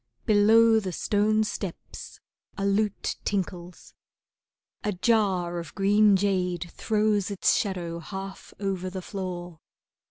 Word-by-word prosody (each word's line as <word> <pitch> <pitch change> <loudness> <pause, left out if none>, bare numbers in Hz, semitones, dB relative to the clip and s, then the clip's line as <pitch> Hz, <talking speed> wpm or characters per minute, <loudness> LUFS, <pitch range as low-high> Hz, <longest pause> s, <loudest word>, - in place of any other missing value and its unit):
Below 220 +2 +5
the 190 -4 -4
stone 215 +4 +1
steps 195 -4 -7 0.4
a 195 - -1
lute 205 +1 0
tinkles. 180 -3 -4 0.9
A 210 - -1
jar 185 -4 +1
of 165 -3 -9
green 205 +1 +4
jade 180 -3 -1
throws 210 -2 0
its 200 -2 +2
shadow 175 -4 -2
half 195 +3 -8
over 190 -2 -2
the 185 0 -6
floor. 175 -4 -6
195 Hz, 115 wpm, -26 LUFS, 180-210 Hz, 0.9 s, Below